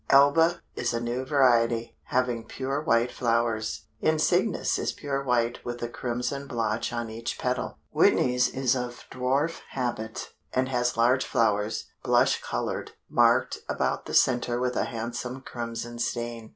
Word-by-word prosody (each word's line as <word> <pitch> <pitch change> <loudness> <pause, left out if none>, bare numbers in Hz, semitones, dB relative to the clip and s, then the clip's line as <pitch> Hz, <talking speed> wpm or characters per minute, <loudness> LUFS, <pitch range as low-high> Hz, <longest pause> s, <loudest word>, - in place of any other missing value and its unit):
Alba 160 +5 +5
is - - -1
a - - 0
new 120 +2 -2
variety, 120 -4 +3
having 125 -2 0
pure 135 +4 -3
white 120 -5 +2
flowers; 115 -2 0
Insignis 175 +6 +2
is - - -1
pure 140 -2 -3
white 120 -2 0
with 120 0 -5
a - - 0
crimson 125 +3 -3
blotch 115 -2 -1
on 120 -2 -3
each 115 +1 -4
petal; 125 0 -2
Whitney's 125 0 +3
is 130 -1 +1
of 125 -1 -5
dwarf 135 +6 0
habit, 120 -4 -3 0.2
and 130 +1 +1
has 120 -2 0
large 125 +3 +4
flowers, 105 -1 +1 0.2
blush - - +3
colored, - - -3 0.2
marked - - +3
about - - -1
the - - -3
center 120 -1 +3
with 125 0 0
a - - +1
handsome 120 +3 -4
crimson 120 -1 -5
stain. 120 -1 -3
120 Hz, 145 wpm, -27 LUFS, 115-130 Hz, 0.2 s, Alba